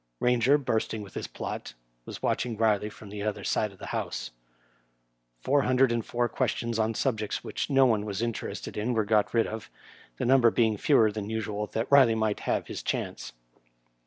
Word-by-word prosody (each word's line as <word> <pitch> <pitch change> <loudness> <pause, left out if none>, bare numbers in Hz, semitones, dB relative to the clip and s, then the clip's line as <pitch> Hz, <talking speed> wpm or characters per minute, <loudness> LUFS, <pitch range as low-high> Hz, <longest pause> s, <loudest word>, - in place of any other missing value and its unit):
Eainger, 125 +3 +4
bursting 110 -5 -2
with 100 - -12
his - - -4
plot, - - -6 0.3
was - - -9
watching 120 -2 -1
Kiley 105 -1 +1
from 105 0 -12
the 105 0 -6
other 105 0 -3
side 105 - 0
of 100 - -17
the - - -9
House. - - -3 1.1
Four 145 +1 +3
hundred 130 -1 +3
and 120 -1 0
four 120 +2 0
questions 115 -2 -1
on 110 +1 +1
subjects 110 -5 -1
which - - -3
no 135 -1 +5
one 110 -4 +2
was 100 -2 -4
interested 115 -1 -4
in 115 +4 -1
were 110 -2 +1
got 105 0 +2
rid 115 -1 +3
of, 110 -3 -6 0.5
the - - -2
number 125 -1 +6
being 110 -2 +2
fewer 110 +1 +4
than 105 -1 -5
usual 105 -1 -3
that 115 +1 0
Riley 130 -5 +6
might 110 -2 0
have - - -1
hia - - -7
chance. - - -4
110 Hz, 190 wpm, -28 LUFS, 105-120 Hz, 1.1 s, number